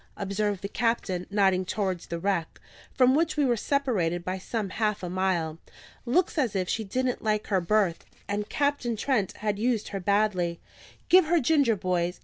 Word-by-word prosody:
observed 200 Hz, 0 st, -2 dB
the -, -, -1 dB
captain, 205 Hz, -5 st, -1 dB
nodding 195 Hz, -2 st, +2 dB
towards 185 Hz, -2 st, -2 dB
the 170 Hz, -, -3 dB
wreck, 170 Hz, -2 st, -2 dB, 0.3 s
from 255 Hz, 0 st, +4 dB
which 310 Hz, +1 st, +1 dB
we 290 Hz, -, +3 dB
were 245 Hz, -2 st, +2 dB
separated 210 Hz, -, 0 dB
by 185 Hz, -, -2 dB
some 195 Hz, +1 st, -4 dB
half 210 Hz, -2 st, -1 dB
a 180 Hz, -, -3 dB
mile. 175 Hz, -4 st, -1 dB, 0.5 s
"Looks 335 Hz, +5 st, +2 dB
as 235 Hz, -8 st, 0 dB
if 185 Hz, -1 st, 0 dB
she 220 Hz, -, -1 dB
didn't 250 Hz, +5 st, -2 dB
like 215 Hz, -1 st, 0 dB
her 190 Hz, -, +3 dB
berth, 190 Hz, -2 st, +1 dB, 0.2 s
and 205 Hz, +1 st, -3 dB
Captain 285 Hz, -5 st, 0 dB
Trent 215 Hz, -4 st, 0 dB
had 210 Hz, -1 st, -2 dB
used 230 Hz, -2 st, 0 dB
her 195 Hz, -, -4 dB
badly. 185 Hz, -3 st, +1 dB, 0.5 s
Give 365 Hz, -1 st, +6 dB
her 340 Hz, +2 st, +3 dB
ginger, 280 Hz, -5 st, +3 dB
boys!" 180 Hz, -2 st, -1 dB
205 Hz, 175 wpm, -27 LUFS, 185-240 Hz, 0.5 s, Give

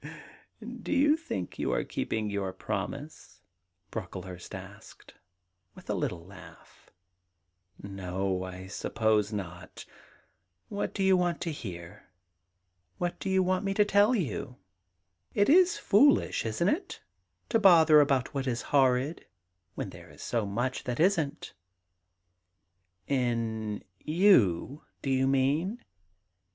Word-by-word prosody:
*Do -, -, -6 dB
you 295 Hz, +1 st, +4 dB
think 205 Hz, -, -6 dB
you -, -, 0 dB
are -, -, 0 dB
keeping 110 Hz, -1 st, -3 dB
your 100 Hz, -2 st, -2 dB
promise?' 105 Hz, -, -6 dB, 0.5 s
Brocklehurst 90 Hz, -3 st, -7 dB
asked, -, -, -12 dB, 0.6 s
with -, -, -7 dB
a -, -, +1 dB
little 85 Hz, -1 st, -3 dB
laugh. 85 Hz, -4 st, -15 dB, 0.5 s
' 90 Hz, +1 st, -48 dB
No; 95 Hz, -1 st, -3 dB
I 95 Hz, 0 st, -8 dB
suppose 105 Hz, +1 st, 0 dB
not' 90 Hz, -4 st, -7 dB, 0.4 s
* 90 Hz, +1 st, -47 dB
What 205 Hz, -1 st, -3 dB
do 195 Hz, -, 0 dB
you 190 Hz, 0 st, +5 dB
want 175 Hz, -2 st, 0 dB
to 170 Hz, -2 st, -2 dB
hear? 90 Hz, -, -9 dB, 0.9 s
AVhat 175 Hz, -1 st, -2 dB
do 195 Hz, -, -3 dB
you 190 Hz, 0 st, +3 dB
want 185 Hz, +1 st, 0 dB
me 195 Hz, 0 st, -1 dB
to 210 Hz, -, +4 dB
tell 205 Hz, +4 st, +4 dB
you? 125 Hz, -, -3 dB, 0.8 s
It 205 Hz, +2 st, +3 dB
is 360 Hz, +3 st, +5 dB
foolish, 230 Hz, -, +3 dB
isn't 140 Hz, -, +1 dB
it, 335 Hz, -, -3 dB, 0.5 s
to 225 Hz, -, +3 dB
bother 165 Hz, -6 st, +7 dB
about 135 Hz, -1 st, +1 dB
what 135 Hz, -2 st, -2 dB
is 120 Hz, -3 st, -2 dB
horrid, 135 Hz, +3 st, +2 dB, 0.5 s
when -, -, -4 dB
there -, -, -13 dB
is -, -, -12 dB
so 115 Hz, -4 st, -1 dB
much 120 Hz, +6 st, -2 dB
that 125 Hz, -1 st, -3 dB
isn't? 160 Hz, -4 st, +1 dB, 0.7 s
' 90 Hz, 0 st, -50 dB
* 90 Hz, +1 st, -49 dB, 0.2 s
In 115 Hz, -5 st, -1 dB, 0.2 s
you, 150 Hz, -, +3 dB, 0.2 s
do 135 Hz, -, -1 dB
you 130 Hz, 0 st, +2 dB
mean 145 Hz, -, 0 dB
125 Hz, 135 wpm, -29 LUFS, -, 0.9 s, bother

